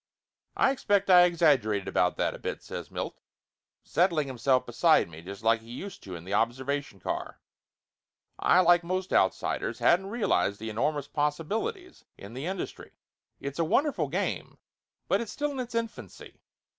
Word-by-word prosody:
"I 265 - +4
expect 200 -7 +1
I 180 -1 +9
exaggerated 140 - +2
about 90 0 +1
that - - 0
a - - -9
bit," - - -5
says - - -7
Milt, - - -5 0.6
settling 165 -2 +2
himself 130 0 +1
beside 125 +7 +3
me 80 -1 -11
just 100 +5 -9
like 115 0 +3
he 115 - -16
used 185 +11 -7
to 95 -2 -8
in 85 - -9
the 95 +3 -6
observation 130 +1 -1
car. - - -4 1.0
"I, 185 - +5
like 175 -1 +5
most 185 +2 -2
outsiders, - - +1
hadn't 190 +3 +3
real 230 0 0
ized 100 0 +1
the 110 0 -5
enormous 145 +6 -1
possibilities 210 - -3
in 100 +3 -10
the 135 +6 -5
industry. 190 -1 -5 0.5
It's 140 +3 -6
a - - +3
wonderful 275 - +1
game, - - -3 0.5
but - - +2
it - - -3
is 210 - -9
still 295 0 -2
in 275 - -5
its 245 -2 -5
infancy. 230 -1 -6
150 Hz, 170 wpm, -28 LUFS, 115-195 Hz, 1.0 s, I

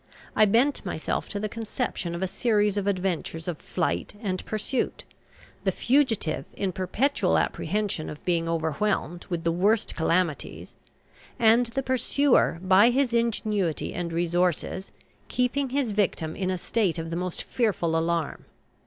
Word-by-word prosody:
I 215 - +6
bent 240 +8 +2
myself 160 - -3
to 205 - -3
the 215 - -1
conception 215 -5 -3
of 175 - -3
a - - +1
series 210 -1 +1
of 200 -1 -1
adventures 180 -4 -2
of 170 -4 -3
flight 85 - -2
and 190 -4 -3
pursuit; 215 +4 -2 0.6
the 190 - +2
fugitive 235 - +1
in 195 -2 -1
perpetual 190 +4 +1
apprehension 195 -2 -1
of 150 - -9
being 170 -2 +1
overwhelmed 165 +2 -1
with 170 -2 -2
the 165 - +2
worst 200 +6 +2
calamities, 165 -1 -1 0.6
and 235 0 +5
the 270 +4 -3
pursuer, 260 - +2
by 190 +5 +6
his 255 -1 +1
ingenuity 215 -7 0
and 170 -1 -3
resources, 175 +2 0 0.4
keeping 255 +2 0
his 265 -3 0
victim 185 -6 0
in 185 -2 -2
a 185 - 0
state 190 -1 0
of 165 0 -4
the - - -2
most 180 0 -3
fearful 190 -9 0
alarm. 165 -1 -1
190 Hz, 145 wpm, -26 LUFS, 170-230 Hz, 0.6 s, I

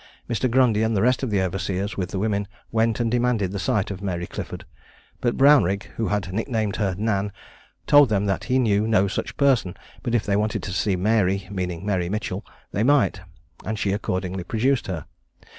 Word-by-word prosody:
Mr. 125 +2 0
Grundy 120 -3 +3
and 110 -1 +1
the - - +2
rest 125 +1 +3
of 130 - -1
the 100 -3 +1
overseers, 95 +2 -2
with 90 -2 -3
the 100 - -4
women, 100 0 0 0.2
went 115 0 +1
and 115 -1 0
demanded 120 -6 +1
a 100 - -3
sight 100 +4 0
of 95 -1 -6
Mary 90 -3 -2
Clifford; - - -7 0.5
but 120 -1 0
Brownrigg, 115 -9 +4
who 115 - 0
had 95 -3 -2
nicknamed 110 -1 -1
her 100 -4 0
Nan, 100 -1 0 0.5
told 145 -3 +6
them 105 -1 +1
that 95 -1 -1
he 130 - +1
knew 110 -4 +2
no 100 -3 +3
such 100 - -4
person; 130 -10 +2 0.2
but, 120 - -1
if 115 - +1
they 100 - +1
wanted 105 +1 0
to 95 - -4
see 95 +1 +1
Mary 100 0 +1
(meaning 90 -2 -3
Mary 90 -4 0
Mitchell), 105 0 -3 0.3
they 100 - -1
might, 140 +3 +3 0.4
and 110 +2 -3
she 100 - 0
accordingly 95 -2 -2
produced 120 +5 0
her. 80 -6 -4
105 Hz, 195 wpm, -24 LUFS, 95-115 Hz, 0.5 s, told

